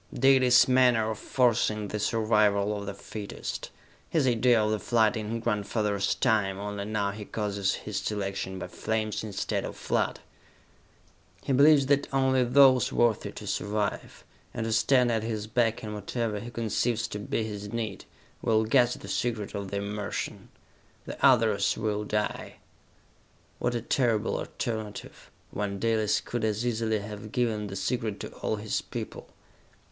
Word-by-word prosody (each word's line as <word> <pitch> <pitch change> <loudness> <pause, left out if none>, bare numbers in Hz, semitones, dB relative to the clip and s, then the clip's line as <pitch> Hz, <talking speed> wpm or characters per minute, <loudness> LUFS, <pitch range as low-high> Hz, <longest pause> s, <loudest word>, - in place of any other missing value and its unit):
Dalis' 130 -2 +5
manner 125 -4 +4
of 110 - -6
forcing 110 -4 +1
the 105 - -3
survival 105 -2 +2
of 100 -1 -6
the 100 - -3
fittest! 105 +1 -6 0.4
His 155 -4 +2
idea 120 -1 +4
of 105 - +1
the 110 - 0
flood 110 -1 +2
in 110 +1 -3
grandfather's 105 -2 0
time, 105 -6 +1
only 100 0 -4
now 105 -2 -1
he 105 +1 -7
causes 100 -2 -1
his - - -5
selection 95 -2 -3
by - - -5
flames 110 -1 -2
instead 105 -3 -2
of - - -6
flood! - - -1 1.2
He 135 - 0
believes 140 +1 +6
that 140 +1 +1
only 130 -1 +3
those 130 +1 +5
worthy 120 -3 +1
to - - -9
survive, 105 0 -3 0.3
and 120 - -2
to 115 - -2
stand 125 +2 +3
at 110 -1 +1
his 110 -2 -3
back 115 0 0
in 105 -1 -5
whatever 105 +1 -3
he 115 +3 -7
conceives 115 0 -1
to 105 - -5
be 105 +2 -2
his 105 -1 -6
need, 115 -2 -4 0.4
will 110 -1 +2
guess 120 +1 +3
the - - -11
secret 115 -4 -2
of 100 -1 -4
the 100 - -3
immersion. 100 +1 -4 0.6
The - - -8
others 110 -5 +4
will 105 -1 -1
die!" 105 0 -2 1.0
What 120 - 0
a 115 - -2
terrible 115 -4 +1
alternative, 110 -3 -5 0.2
when 100 -1 -3
Dalis 110 0 +1
could 120 -2 -4
as 110 +2 0
easily 110 -2 0
have 105 +1 -7
given 110 -4 0
the 95 - -7
secret 110 +2 -2
to - - -5
all - - -1
his 105 0 -2
people! - - -7
110 Hz, 155 wpm, -28 LUFS, 105-120 Hz, 1.2 s, believes